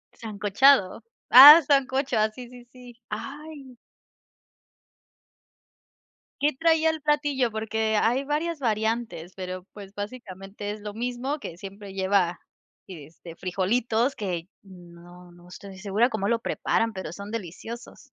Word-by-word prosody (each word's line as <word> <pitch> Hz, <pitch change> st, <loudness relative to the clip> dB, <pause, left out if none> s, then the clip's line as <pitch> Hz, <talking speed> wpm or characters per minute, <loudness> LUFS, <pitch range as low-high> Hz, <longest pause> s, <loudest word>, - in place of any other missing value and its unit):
¿Sancochado? 210 Hz, 0 st, +2 dB, 0.3 s
Ah, 290 Hz, +6 st, +11 dB
sancocho. 270 Hz, -3 st, 0 dB
Ah, 215 Hz, 0 st, +2 dB
sí, 245 Hz, +2 st, -11 dB
sí, 245 Hz, -1 st, -14 dB
sí. 245 Hz, -1 st, -15 dB
¡Ay! 275 Hz, +2 st, -9 dB, 2.6 s
¿Qué 295 Hz, +1 st, +2 dB
traía 320 Hz, 0 st, +3 dB
el 320 Hz, -1 st, -3 dB
platillo? 290 Hz, -5 st, 0 dB
Porque 220 Hz, 0 st, -1 dB
hay 245 Hz, +6 st, +1 dB
varias 305 Hz, +3 st, -3 dB
variantes, 220 Hz, -6 st, -2 dB
pero 185 Hz, -1 st, -7 dB
pues 200 Hz, -1 st, -12 dB
básicamente 205 Hz, -2 st, -8 dB
es 210 Hz, -, -7 dB
lo 205 Hz, 0 st, -8 dB
mismo 245 Hz, +5 st, -3 dB
que 170 Hz, -11 st, -9 dB
siempre 195 Hz, +1 st, -10 dB
lleva, 190 Hz, -2 st, 0 dB, 0.5 s
y, 165 Hz, -7 st, -10 dB
este, 165 Hz, +1 st, -13 dB
frijolitos 225 Hz, +7 st, -1 dB
que 180 Hz, -4 st, -4 dB, 0.2 s
no 175 Hz, -1 st, -15 dB
no 175 Hz, 0 st, -18 dB
estoy 195 Hz, +1 st, -11 dB
segura 205 Hz, +4 st, +1 dB
cómo 210 Hz, -2 st, -2 dB
lo 235 Hz, -, +1 dB
preparan, 225 Hz, 0 st, -1 dB
pero 190 Hz, -4 st, -7 dB
son 200 Hz, +3 st, -9 dB
deliciosos. 225 Hz, +3 st, -8 dB
220 Hz, 130 wpm, -25 LUFS, 190-255 Hz, 2.6 s, Ah